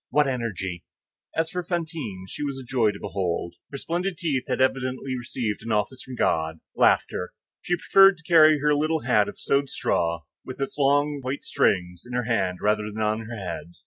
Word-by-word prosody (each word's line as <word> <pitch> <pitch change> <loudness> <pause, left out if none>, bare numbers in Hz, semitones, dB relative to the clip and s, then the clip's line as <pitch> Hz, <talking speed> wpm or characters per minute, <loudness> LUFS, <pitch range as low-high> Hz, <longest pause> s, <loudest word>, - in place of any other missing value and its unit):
What 150 -1 +3
energy!" 95 -9 -3 0.5
As 160 0 +1
for 180 - -2
Fantine, 160 - -4
she - - -8
was 140 -2 -2
a 135 - -7
joy 120 -3 +2
to 100 -1 -5
behold. 90 -4 -2 0.2
Her 140 - -5
splendid 175 +5 -2
teeth 155 -8 -1
had - - -1
evidently 130 0 0
received 120 -3 -3
an 115 +1 -5
office 105 +5 0
from 130 - -8
God,—laughter. 80 0 +1 0.3
She 175 - 0
preferred 195 +2 +6
to 165 - -18
carry 155 -3 +6
her 150 0 +3
little 155 +2 +1
hat 110 -5 +3
of - - -11
sewed 140 0 +1
straw, 85 -1 0 0.2
with 130 - -8
its 135 - -3
long 145 +1 +3
white 130 +2 -4
strings, 90 -2 +1
in 125 - -10
her 125 0 0
hand 95 -6 0
rather 105 0 +2
than 105 - -9
on 110 +1 -1
her 115 0 -6
head. 90 -3 -6
130 Hz, 190 wpm, -25 LUFS, 105-150 Hz, 0.5 s, preferred